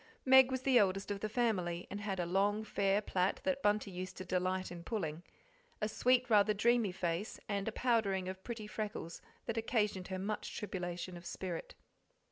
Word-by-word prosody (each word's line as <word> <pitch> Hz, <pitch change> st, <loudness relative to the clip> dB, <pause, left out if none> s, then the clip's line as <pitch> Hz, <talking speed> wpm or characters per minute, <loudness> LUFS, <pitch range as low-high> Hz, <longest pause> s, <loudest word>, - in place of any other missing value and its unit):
Meg 265 Hz, 0 st, +8 dB
was 260 Hz, -1 st, -2 dB
the 265 Hz, -3 st, +5 dB
eldest 195 Hz, 0 st, +1 dB
of 200 Hz, -, -2 dB
the 215 Hz, -, -2 dB
family, 185 Hz, -7 st, 0 dB
and 205 Hz, -, -4 dB
had 195 Hz, -3 st, -2 dB
a 175 Hz, -, 0 dB
long, 200 Hz, +4 st, +1 dB
fair 200 Hz, -1 st, +1 dB
plait 185 Hz, -1 st, 0 dB
that 275 Hz, -1 st, 0 dB
Bunty 205 Hz, -2 st, +1 dB
used 185 Hz, +1 st, -6 dB
to 185 Hz, -, -6 dB
delight 185 Hz, 0 st, -1 dB
in 170 Hz, -1 st, -7 dB
pulling; 170 Hz, -7 st, -3 dB, 0.6 s
a 215 Hz, -, 0 dB
sweet, 250 Hz, +3 st, +3 dB
rather 210 Hz, -2 st, +4 dB
dreamy 230 Hz, -1 st, +3 dB
face, 180 Hz, +2 st, -2 dB
and 200 Hz, -1 st, -2 dB
a -, -, 0 dB
powdering 215 Hz, -6 st, +1 dB
of 190 Hz, 0 st, -6 dB
pretty 230 Hz, -3 st, -5 dB
freckles 210 Hz, -5 st, -5 dB, 0.2 s
that 230 Hz, -1 st, -3 dB
occasioned 210 Hz, -5 st, 0 dB
her 190 Hz, -, -3 dB
much 205 Hz, +3 st, -3 dB
tribulation 180 Hz, -3 st, -4 dB
of 175 Hz, -, -12 dB
spirit. 180 Hz, -3 st, -5 dB
200 Hz, 185 wpm, -35 LUFS, 185-220 Hz, 0.6 s, Meg